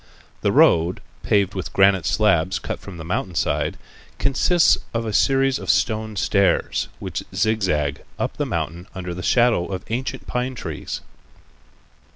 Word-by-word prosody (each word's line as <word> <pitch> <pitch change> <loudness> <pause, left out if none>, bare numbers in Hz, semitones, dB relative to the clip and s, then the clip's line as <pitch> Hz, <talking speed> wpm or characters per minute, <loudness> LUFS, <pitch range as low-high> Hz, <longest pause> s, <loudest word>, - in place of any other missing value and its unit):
The - - +2
road, 85 +2 +4 0.2
paved 100 -2 +2
with 95 - -5
granite 95 -4 +4
slabs 95 -5 +2
cut - - -5
from 95 -3 -10
the 80 - -8
mountain 95 0 -2
side, - - 0 0.4
consists 160 +5 +3 0.2
of 115 0 -1
a 110 - -3
series 135 +3 +3
of - - -7
stone 110 -1 +1
stairs, 100 +1 +1
which - - -4
zig 110 0 +1
zag 75 -6 0 0.2
up - - -3
the - - -1
mountain 85 +3 -3
under 90 -2 -5
the 90 - -6
shadow 120 -5 +3
of 95 -2 -5
ancient 125 +3 -3
pine 125 +1 -2
trees. 80 -10 -5
100 Hz, 155 wpm, -22 LUFS, 90-115 Hz, 0.4 s, road